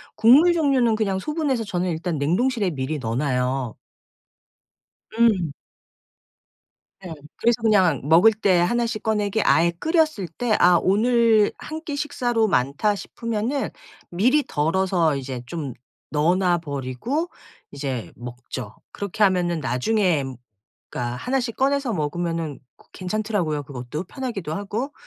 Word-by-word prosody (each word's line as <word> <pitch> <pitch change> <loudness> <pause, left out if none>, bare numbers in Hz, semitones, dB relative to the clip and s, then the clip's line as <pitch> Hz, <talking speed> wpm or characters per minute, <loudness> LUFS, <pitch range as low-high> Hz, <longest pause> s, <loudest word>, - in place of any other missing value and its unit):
국물 270 +11 +6
종류는 270 -8 +2
그냥 195 -3 0
소분해서 285 -3 -1
저는 180 -2 -2
일단 165 -1 -2
냉동실에 205 - +1
미리 140 +2 -3
넣어 115 -1 -3
놔요. 130 -3 -1 1.4
음. 215 -8 +2 1.5
네. 175 - -6 0.2
그래서 235 0 +1
그냥 190 - +3
먹을 170 +9 +6
때 200 -4 +2
1 235 +7 +1
씩 230 -2 -4
꺼내게 215 -1 0
아예 170 +1 +4
끓였을 310 - +1
때 215 +7 -1
'아 175 -1 +6
오늘 220 +1 +3
1 315 +1 -7
끼 290 - -3
식사로 245 -6 0
많다.' 145 +7 +1
싶으면은 230 +6 -3 0.4
미리 250 +12 +2
덜어서 165 0 +1
이제 130 -2 -5
좀 145 -3 -5 0.4
넣어 155 +4 +2
놔 180 -2 +2
버리고 145 - -3 0.4
이제 135 -4 -4
먹죠. 120 -2 -8 0.2
그렇게 200 +1 -2
하면은 180 -4 +2
나중에 155 - +1 0.7
그러니까 120 0 -3
1 265 - -1
씩 235 -2 -4
꺼내서 275 -3 +1
먹으면은 165 -1 -2 0.2
고 - - -23
괜찮더라고요 185 -5 -2
그것도 130 +4 -6
편하기도 225 - -5
하고. 210 - -3
190 Hz, 270 characters per minute, -23 LUFS, 150-230 Hz, 1.5 s, 국물